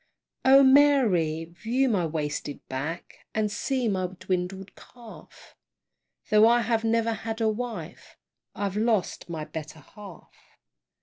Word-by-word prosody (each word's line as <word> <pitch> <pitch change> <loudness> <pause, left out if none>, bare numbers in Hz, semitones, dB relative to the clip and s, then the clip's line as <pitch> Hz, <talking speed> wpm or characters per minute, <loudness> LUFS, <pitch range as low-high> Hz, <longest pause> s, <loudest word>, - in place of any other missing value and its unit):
O 270 +1 +7
Mary! 245 - +4
view 230 +11 -1
my 190 -8 +1
wasted 150 -2 -4
back, 145 +6 -6 0.2
And 215 -1 0
see 250 +3 -1
my 185 -3 0
dwindled 185 +1 -4
calf; 235 -3 -15 0.8
Tho' 215 +1 +6
I 240 +1 +4
have 230 -1 0
never 230 0 +1
had 225 +1 -5
a 225 - +1
wife, 235 +2 -6 0.4
I've 200 -1 -3
lost 215 -5 0
my 160 -2 -5
better 155 0 -8
half. 200 +1 -14
210 Hz, 125 wpm, -26 LUFS, 175-235 Hz, 0.8 s, O